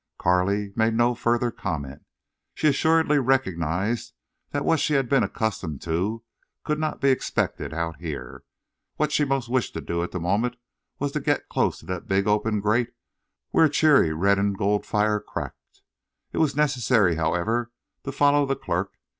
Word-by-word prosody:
Carley 100 +3 +1
made 115 0 +2
no 120 +1 +3
further 120 0 0
comment. 70 -10 -5 0.5
She 155 - +1
assuredly 155 +1 +3
recognized 115 - 0 0.4
that 145 0 -2
what 165 - +3
she 150 - +1
had 135 -2 +2
been 135 +2 +3
accustomed 95 - -3
to 95 +8 -2 0.4
could 150 0 -1
not 155 -1 -2
be 140 - +3
expected 130 - -1
out 80 0 -3
here. 70 -7 -7 0.5
What 150 -1 0
she 150 - +2
most 135 -3 -1
wished 125 0 -1
to - - -2
do 85 0 -2
at 85 - -3
the 90 - -4
moment 105 +8 0 0.4
was 145 0 -2
to 150 - -2
get 145 0 -1
close - - 0
to - - -16
the 90 -1 -4
big 95 +1 0
open 105 0 +1
grate 110 +4 +1 0.6
where 160 - +5
a - - +3
cheery 145 - +4
red 100 +5 +2
and 100 -1 0
gold 105 +1 0
fire 105 0 +1
cracked. 105 - -8 0.5
It - - -2
was 155 -4 +2
necessary, 125 - +2
however, 105 +9 0 0.3
to 140 - -4
follow 145 +1 +3
the 135 - 0
clerk. 90 -1 -3
110 Hz, 170 wpm, -25 LUFS, 90-135 Hz, 0.6 s, where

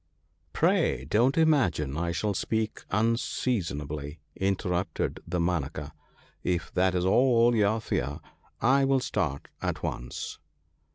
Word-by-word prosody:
'Pray 65 - +2
don't 115 - +2
imagine 115 - +2
I 85 +2 -1
shall 105 +5 -1
speak 110 +3 -2
unseasonably/ 85 - -1 0.2
in 95 0 +1
terrupted 90 +1 -2
Damanaka; 85 -4 -1 0.3
' - - -32
if 85 - -4
that 95 0 +2
is 90 0 +1
all 120 +3 +4
you 110 +1 +3
fear, 70 -8 -2 0.4
I 135 +3 +4
will 135 0 +3
start 70 - -2
at - - -2
once.' - - -4
95 Hz, 120 wpm, -28 LUFS, 80-115 Hz, 0.4 s, all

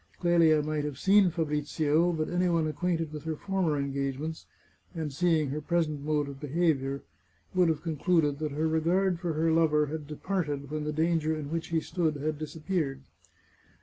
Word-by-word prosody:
Clelia 165 -3 +4
might 155 0 -1
have 145 -3 -4
seen 195 +3 +5
Fabrizio, 155 +1 +1
but 155 -2 -1
any 180 +1 +1
one 165 -2 +2
acquainted 165 0 -1
with 150 -2 -6
her 160 -1 -2
former 185 -3 0
engagements, 140 +3 -3 0.5
and 155 -4 -3
seeing 160 -3 +2
her 150 +2 -3
present 155 -2 0
mode 150 -1 0
of 140 -1 -8
behaviour, 140 -2 0 0.5
would 180 -2 +4
have 155 -1 -1
con 160 -3 -3
cluded 150 -3 +2
that 155 -1 -2
her 155 +2 0
regard 170 +3 +1
for 170 -2 -2
her 160 +1 +1
lover 155 -2 +3
had 150 0 -6
departed 150 -3 -3
when 155 -1 -3
the 150 - -1
danger 160 0 +1
in 150 -1 -6
which 165 0 -2
he 165 -1 +1
stood 160 -2 -1
had 150 +1 -3
disappeared. 155 -3 -3
155 Hz, 180 wpm, -29 LUFS, 150-170 Hz, 0.5 s, seen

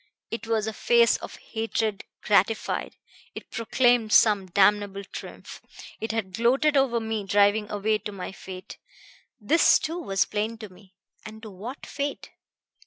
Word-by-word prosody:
It 230 0 -5
was 220 -2 0
a 220 - -3
face 235 +1 +3
of - - -9
hatred 220 -2 -3 0.2
gratified, 210 +1 +1 0.4
it - - -10
proclaimed 230 0 +2
some 205 -4 +5
damnable 200 +1 +2
triumph. 195 - -10 0.4
It 220 - -3
had 215 -4 -3
gloated 265 +8 +2
over 265 -4 +2
me 220 -2 -3
driving 205 +2 +2
away 210 +1 0
to 210 +1 -6
my 190 -2 -6
fate. 185 0 -10 0.6
This 295 +10 +4
too 335 +3 -4
was 195 - +1
plain 215 +2 -3
to 215 -2 -9
me. 190 0 -20 0.3
And 220 0 -10
to 215 - -8
what 225 +9 -8
fate? 285 0 -5
215 Hz, 150 wpm, -26 LUFS, 200-230 Hz, 0.6 s, some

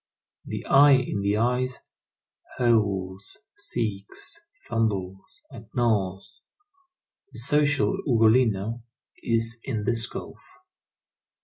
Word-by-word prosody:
The - - -6
I 140 +1 +6
in 130 -6 +1
the 100 +1 +1
eyes 125 +2 0 0.8
howls, 100 -6 0 0.2
seeks, 115 - -4 0.2
fumbles, 100 -5 -3
and - - -12
gnaws. 95 -5 -1 0.9
The - - -11
social 150 +6 +1
Ugolino 115 -2 +2 0.4
is 115 0 0
in 110 -6 -3
this 115 0 +1
gulf. - - -9
115 Hz, 90 wpm, -25 LUFS, 100-125 Hz, 0.9 s, I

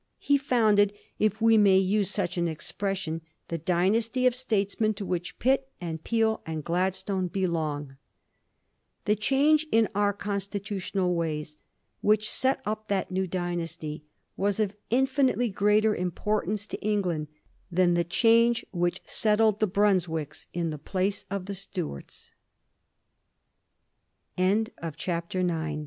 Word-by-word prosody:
He 285 - +2
founded, 215 -6 +3 0.3
if 215 0 +1
we 225 -1 +5
may 195 -2 +6
use 195 +1 +2
such 200 -3 0
an 175 -1 0
ex 160 -2 -5
pression, 190 -5 -3 0.3
the 165 - -3
dynasty 215 - +1
of 250 - +5
statesmen 215 -3 0
to 200 0 -5
which 175 -1 -3
Pitt, 265 +1 +1
and 160 -2 -5
Peel, 225 -1 +1
and 160 -2 -5
Gladstone 185 +2 -1
belong. 155 -7 -2 1.1
The 210 - +3
change 290 +8 +3
in 225 -1 +4
our 205 0 +2
constitutional 200 -2 -2
ways 155 -3 -3 0.5
which 215 0 +3
set 260 +1 +1
up 215 +1 -3
that 195 -2 -1
new 190 0 -1
dynasty 170 -4 -4 0.3
was 200 +1 0
of 210 -2 0
infinitely 260 -1 +2
greater 210 +2 +3
importance 205 +3 -1
to - - -7
England 185 -7 -1 0.4
than 175 0 +3
the 175 0 +2
change 230 +6 +3
which 175 0 -1
settled 215 -1 +3
the 215 - +2
Bruns 195 -2 +2
200 Hz, 110 wpm, -27 LUFS, 175-215 Hz, 1.1 s, may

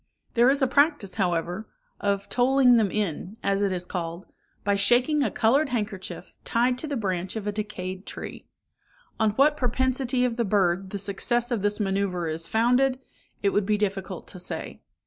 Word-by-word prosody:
There 240 +2 +5
is 275 0 +2
a - - +4
practice, 285 - +2
however, 175 +3 -1 0.3
of 200 -1 -1
tolling 250 0 +4
them 215 -3 +3
in, 200 +1 -3
as 200 0 +1
it 200 -1 +1
is 180 -1 -2
called, 170 0 -5 0.4
by 200 0 +2
shaking 245 +9 +3
a - - +2
coloured 270 +6 +2
handkerchief 210 -6 -4
tied 245 +2 +1
to 310 - -1
the 285 -2 -2
branch 185 -3 -2
of 220 -2 -4
a 210 - 0
decayed 190 -3 -5
tree. - - -8 0.7
On 220 - +4
what 285 +6 +4
propensity 255 0 +1
of 240 -1 -2
the 235 - +2
bird 190 -2 +1
the 200 - -4
success 235 +5 -1
of 230 -4 0
this 205 +1 +1
manœuvre 195 -5 -1
is 165 +1 -4
founded, 250 +3 +2 0.4
it 200 - +4
would 200 0 0
be 210 -1 +2
difficult 195 -3 -3
to 185 - -9
say. 175 - -5
210 Hz, 180 wpm, -26 LUFS, 190-250 Hz, 0.7 s, There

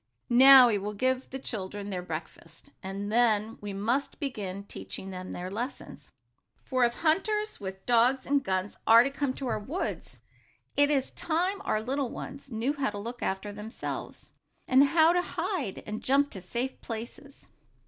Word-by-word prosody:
"Now 260 0 +9
we 210 -3 +1
will 205 +2 -5
give 255 +4 0
the 265 - -5
children 205 -5 -5
their 180 -2 -3
breakfast, 180 - -8
and 200 +2 -5
then 225 -2 +2
we 205 -1 -5
must 240 +8 -1
begin 200 - -4
teaching 100 - -8
them 185 0 -7
their 180 +1 -5
lessons. 240 +7 -6 0.5
For 255 -2 +1
if 235 0 -1
hunters, 420 +6 0
with 190 -1 -7
dogs 245 +2 +3
and 280 0 +2
guns, 190 -2 -2
are 230 +1 +8
to 275 - -2
come 275 -1 -2
to 275 - -5
our 235 -3 -1
woods, 280 - -4 0.6
it 285 0 +4
is 275 -3 +1
time 360 +5 -1
our 215 - 0
little 265 +1 -1
ones 275 +3 -8
knew 235 +5 0
how 280 -2 -1
to 205 - -7
look 235 +4 -6
after 195 +2 -2
themselves, 210 +3 -7 0.4
and 265 +2 +6
how 320 +3 +5
to 355 - +3
hide, 330 - -3
and 215 +1 -5
jump 280 +2 +2
to 190 - -4
safe 240 +8 -4
places." 235 +5 -8
240 Hz, 170 wpm, -28 LUFS, 205-275 Hz, 0.6 s, Now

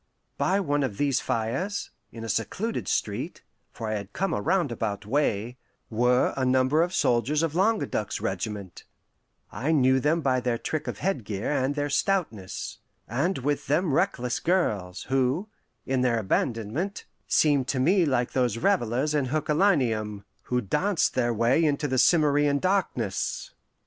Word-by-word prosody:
By 195 +2 +2
one 145 -6 0
of 125 -8 -2
these 140 -3 +2
fires, 135 - -2 0.2
in 115 - -8
a - - -5
secluded 115 - -2
street - - -2 0.3
for 115 - -6
I 110 - -1
had 100 0 -8
come 195 +1 -1
a 105 - -1
roundabout 115 - -1
way 120 -2 0 0.3
were 125 +3 +2
a 135 - -1
number 130 +4 +3
of 175 +1 +1
soldiers 145 -1 +1
of 165 -2 -1
Languedoc's 190 - 0
regiment 95 -1 -4 0.7
(I 130 +10 -1
knew 130 -3 +4
them 155 +5 +1
by 130 -3 +2
their 125 -1 -1
trick 155 +5 -3
of - - -4
headgear 115 - -2
and 140 0 0
their 145 -1 -1
stoutness), 145 - -1 0.3
and 145 - 0
with 145 +2 -2
them 155 +1 +1
reckless 125 -2 0
girls, 105 - 0
who, 135 +9 0 0.4
in 130 -1 0
their 125 -2 +2
abandonment, 115 - -2 0.2
seemed 145 -4 +3
to 135 - -1
me 180 +8 +4
like 130 -6 +1
those 125 -4 +1
revellers 120 +6 +1
in 145 -3 +1
Herculaneum, 130 - +1 0.2
who 125 0 0
danced 160 - +1
their 120 -2 +1
way 115 +7 +2
into 145 -1 +1
the 130 -2 0
Cimmerian 145 -3 +4
darkness. 175 - -1
130 Hz, 150 wpm, -26 LUFS, 115-155 Hz, 0.7 s, knew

